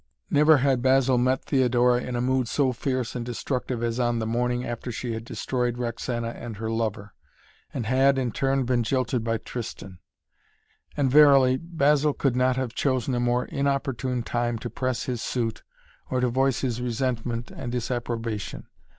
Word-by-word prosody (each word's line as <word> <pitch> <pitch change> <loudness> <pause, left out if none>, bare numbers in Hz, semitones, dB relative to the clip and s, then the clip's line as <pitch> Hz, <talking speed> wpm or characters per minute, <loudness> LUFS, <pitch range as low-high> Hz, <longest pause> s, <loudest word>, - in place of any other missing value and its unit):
Never 150 +1 +6
had 130 -1 +2
Basil 130 -1 +3
met 130 +2 +1
Theodora 125 -2 +3
in 125 - -4
a 120 - 0
mood 130 -1 +1
so 130 +1 +1
fierce 130 0 -2
and 120 - -2
destructive 125 0 -3
as 115 +1 -1
on 120 -1 +1
the 110 - -2
morning 120 +2 0
after 120 +1 -5
she 120 +1 -4
had 110 0 -5
destroyed 125 +1 -2
Roxana 120 0 -3
and 115 -2 -7
her 110 +1 -3
lover, 110 -2 -2 0.6
and 120 - -4
had, 135 +3 +3
in 125 -3 0
turn, 135 +2 0
been 125 -1 +1
jilted 125 0 0
by 115 0 0
Tristan. 100 -6 -7 1.0
And, 135 -3 +2
verily, 135 -3 +6
Basil 150 -2 +2
could 135 -3 0
not 125 0 +2
have 130 -3 -2
chosen 130 -1 0
a 120 - 0
more 120 +1 +1
inopportune 135 -3 -1
time 120 0 -1
to 120 +1 -6
press 130 +1 -2
his 125 -3 -3
suit 115 -3 -2 0.5
or 130 - 0
to 125 0 +2
voice 130 +1 +1
his 125 -2 -2
resentment 120 -1 -2
and 120 - -6
disapprobation. 115 -3 -3
125 Hz, 170 wpm, -25 LUFS, 115-130 Hz, 1.0 s, Never